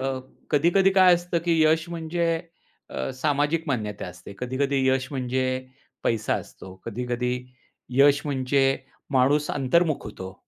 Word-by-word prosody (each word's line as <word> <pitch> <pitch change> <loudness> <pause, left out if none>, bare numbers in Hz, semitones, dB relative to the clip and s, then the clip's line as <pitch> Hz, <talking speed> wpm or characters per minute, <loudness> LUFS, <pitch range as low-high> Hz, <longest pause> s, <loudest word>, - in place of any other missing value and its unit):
अ, 135 0 -1 0.3
कधी-कधी 175 +6 +4
काय 185 -2 +7
असतं, 175 0 -1
की 165 -2 +2
यश 160 +1 +3
म्हणजे 170 0 -2 0.6
अ, 65 - -3
सामाजिक 145 +4 +1
मान्यता 105 -7 -2
असते, 90 +2 -10
कधी-कधी 135 +2 -1
यश 130 0 +1
म्हणजे 130 -1 -1 0.6
पैसा 110 -2 +1
असतो, 95 - -8
कधी-कधी 125 +2 -2 0.7
यश 140 0 +6
म्हणजे 135 -1 +1 0.5
माणूस 140 +3 +3
अंतर्मुख 155 +3 +1
होतो. 95 0 -8
140 Hz, 125 wpm, -25 LUFS, 125-160 Hz, 0.7 s, काय